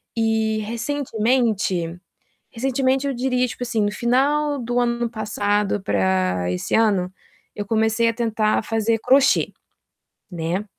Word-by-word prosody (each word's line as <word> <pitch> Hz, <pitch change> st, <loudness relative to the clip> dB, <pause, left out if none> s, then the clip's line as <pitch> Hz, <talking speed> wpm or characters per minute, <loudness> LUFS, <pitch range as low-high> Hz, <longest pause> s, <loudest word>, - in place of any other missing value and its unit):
E 220 Hz, -1 st, +1 dB
recentemente 225 Hz, -, -1 dB, 0.6 s
recentemente 265 Hz, +2 st, 0 dB
eu 275 Hz, -, -1 dB
diria, 250 Hz, 0 st, 0 dB
tipo 245 Hz, -, -8 dB
assim, 235 Hz, -3 st, 0 dB
no 205 Hz, -, +1 dB
final 280 Hz, +6 st, +1 dB
do 245 Hz, +1 st, -1 dB
ano 235 Hz, -1 st, 0 dB
passado 205 Hz, -2 st, -1 dB
pra 95 Hz, -, 0 dB
esse 90 Hz, -, -3 dB
ano, 200 Hz, -5 st, +2 dB, 0.5 s
eu 205 Hz, -, -3 dB
comecei 220 Hz, +2 st, +1 dB
a -, -, +1 dB
tentar 225 Hz, -2 st, 0 dB
fazer 225 Hz, 0 st, 0 dB
crochê, 270 Hz, +4 st, +3 dB, 0.8 s
né. 175 Hz, +3 st, -3 dB
225 Hz, 120 wpm, -22 LUFS, 205-245 Hz, 0.8 s, crochê